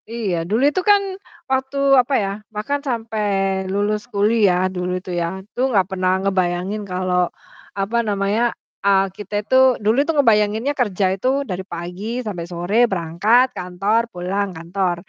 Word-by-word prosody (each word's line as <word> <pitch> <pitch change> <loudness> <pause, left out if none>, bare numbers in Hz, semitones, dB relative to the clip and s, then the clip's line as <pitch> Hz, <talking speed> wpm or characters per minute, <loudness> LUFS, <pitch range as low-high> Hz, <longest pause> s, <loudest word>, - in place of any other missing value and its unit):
Iya, 225 -6 -2
dulu 225 +5 +1
itu 370 - 0
kan, 405 -1 +6 0.5
waktu 265 +1 -1 0.2
apa 250 +3 -4
ya, 195 - -2 0.2
bahkan 220 +7 -2
sampai 225 -5 -2 0.4
lulus 210 +3 -1
kuliah, 205 -4 +2
dulu 180 0 -2
itu 185 0 -7
ya. - - 0 0.2
Itu 250 +5 -1
enggak 200 -7 +3
pernah 185 -1 +1
ngebayangin 185 +1 0
kalau 180 -1 0 0.5
apa 200 +4 -1
namanya, 210 +2 0 0.3
eee, 195 -1 +4
kita 205 0 -10
itu 260 +1 +4
dulu 215 +3 +1
itu 295 - -3
ngebayanginnya 220 +1 +3
kerja 205 -8 0
itu 260 +8 0
dari 190 -6 -4
pagi 180 +1 -7 0.2
sampai 180 -6 -4
sore, 175 +3 -3
berangkat 200 +9 +2
kantor, 195 +5 0
pulang 190 +3 -2
kantor, 175 +2 -1
205 Hz, 145 wpm, -20 LUFS, 185-235 Hz, 0.5 s, kan